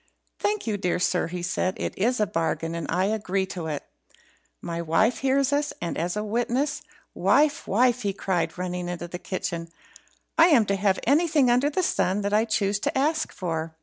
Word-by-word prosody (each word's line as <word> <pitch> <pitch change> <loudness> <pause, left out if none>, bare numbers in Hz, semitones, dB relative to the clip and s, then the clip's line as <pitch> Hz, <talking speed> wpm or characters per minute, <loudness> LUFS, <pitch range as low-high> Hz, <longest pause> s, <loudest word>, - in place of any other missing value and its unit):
"Thank 420 0 -1
you, 215 -3 -1
dear 180 -3 0
sir," 180 -1 +1
he 175 +1 -5
said; 185 +1 -1
"it's 240 +5 -1
a 210 - +3
bargain, 165 -1 -2
and 170 -2 -4
I 180 +3 +1
agree 195 -2 0
to 175 -3 -6
it. 150 -2 -3 0.8
My 170 0 -4
wife 170 +9 +2
hears 270 +1 +2
us, 290 0 0
and 170 - -3
is 175 +3 -2
witness. 240 +7 -1 0.3
Wife! 295 0 +2
wife!" 245 +4 +3
he 200 - 0
cried, 180 -4 -2
running 180 -1 -3
into 175 -1 -5
the 175 +1 -7
kitchen, 180 -3 -4 0.7
"I 330 - +9
am 270 -11 +5
to 200 - 0
have 195 -1 +1
anything 295 -2 +3
under 250 +4 +3
the 365 +5 -1
sun 195 - +1
that 200 0 -2
I 215 +2 +4
choose 205 -2 0
to - - -1
ask 310 +3 +1
for. 165 -3 -4
200 Hz, 185 wpm, -25 LUFS, 175-250 Hz, 0.8 s, I